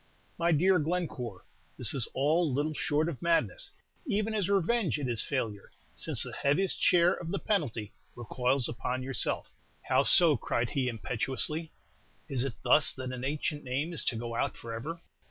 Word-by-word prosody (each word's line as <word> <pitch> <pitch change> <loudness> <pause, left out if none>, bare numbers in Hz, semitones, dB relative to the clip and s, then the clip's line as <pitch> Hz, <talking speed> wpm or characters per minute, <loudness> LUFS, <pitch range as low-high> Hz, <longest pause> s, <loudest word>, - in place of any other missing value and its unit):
"My 170 +1 +2
dear 180 +4 +4
Glencore, 150 - -3 0.3
this - - +1
is 130 -5 0
all 155 +4 +2
little 145 +4 -1
short 150 +1 0
of 165 -7 -5
madness; 170 - +1 0.4
even 215 -1 0
as 200 -3 0
revenge 200 -1 +1
it 145 -3 -3
is 115 -3 +2
a - - -3
failure, 110 -8 -3 0.2
since - - +2
the - - -6
heaviest 170 +7 0
share 175 0 +5
of 170 - -6
the 200 - -1
penalty 130 - -2 0.2
recoils 125 +2 0
upon 125 +2 -3
yourself." 130 -5 -2 0.3
"How - - +2
so?" 165 -6 +5
cried 120 +1 -2
he, 135 -2 0
impetuously. 130 +7 +2 0.6
"Is 135 -5 -1
it 135 -3 -3
thus 135 +4 +4
that 130 -1 -6
an 125 0 -6
ancient 145 +2 -2
name 140 +6 -2
is 165 - -1
to 120 - +1
go 115 +1 -5
out - - -1
forever? 120 +9 -6
145 Hz, 170 wpm, -30 LUFS, 125-170 Hz, 0.6 s, share